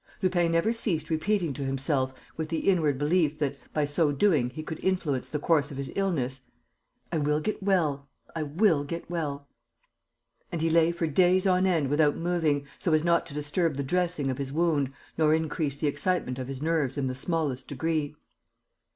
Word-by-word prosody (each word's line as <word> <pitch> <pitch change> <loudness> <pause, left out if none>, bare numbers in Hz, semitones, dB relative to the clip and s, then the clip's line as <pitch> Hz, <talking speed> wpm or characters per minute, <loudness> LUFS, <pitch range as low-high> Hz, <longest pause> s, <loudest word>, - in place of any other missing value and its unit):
Lupin 175 -2 +2
never 165 +7 +2
ceased 170 -9 -1
repeating 170 0 0
to 140 - -5
himself, 135 0 0 0.2
with 160 -1 -4
the 165 - -1
inward 160 -8 +3
belief 150 +1 +1
that, 145 -2 -1 0.2
by 150 -1 +1
so 145 +1 +2
doing, 145 -5 +2
he 155 +5 -7
could 160 0 -6
influence 165 -9 0
the 150 - -2
course 150 -1 +2
of 140 - -8
his 140 0 -4
illness: 135 -10 -1 0.7
"I 165 - 0
will 150 +1 +1
get 215 +6 -3
well.... 155 -8 +1 0.3
I 165 - -2
will 155 +1 +2
get 165 +4 -6
well...." 145 -4 -3 1.0
And 170 - -2
he 165 +1 +1
lay 165 0 +4
for 170 0 -2
days 180 +4 +3
on 185 0 +3
end 165 -6 +2
without 145 0 +3
moving, 165 -5 0
so 170 - 0
as 155 0 +3
not 170 0 +2
to 145 - -10
disturb 150 +2 0
the 140 - -1
dressing 170 -2 0
of 130 - -5
his 135 -1 -3
wound 150 -4 +1 0.3
nor 155 0 +5
increase 155 -3 -2
the - - -1
excitement 145 -3 -1
of 130 - -4
his 135 +1 -5
nerves 155 -5 0
in 140 - 0
the 130 - -1
smallest 140 -1 -1
degree. 150 +1 -2
155 Hz, 190 wpm, -27 LUFS, 140-170 Hz, 1.0 s, nor